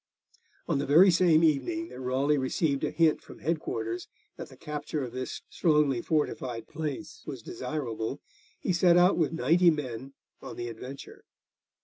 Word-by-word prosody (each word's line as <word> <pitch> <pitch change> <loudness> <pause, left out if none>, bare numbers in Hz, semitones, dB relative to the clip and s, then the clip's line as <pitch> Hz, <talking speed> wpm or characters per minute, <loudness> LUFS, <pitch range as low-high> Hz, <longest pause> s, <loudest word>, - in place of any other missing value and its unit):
On 140 - +1
the 145 - -2
very 175 +7 +7
same 170 -2 +4
evening 330 - +1
that - - -10
Raleigh 135 +3 +1
received 140 +2 0
a - - +1
hint 165 -2 +2
from - - -13
head 165 0 -1
quarters 115 -4 -4 0.3
that - - -8
the - - -15
capture 150 0 -4
of 125 - -5
this 130 +1 -5
strongly 150 -6 +2
fortified 125 -7 -2
place 155 0 -5
was 135 -6 -6
desirable, 125 -5 -4 0.4
he - - -1
set 175 0 +5
out 180 +2 +5
with 160 -4 +1
ninety 165 +4 +4
men 135 -4 -3 0.3
on - - -8
the 120 0 -4
adventure. 125 +4 -9
145 Hz, 160 wpm, -28 LUFS, 130-165 Hz, 0.4 s, very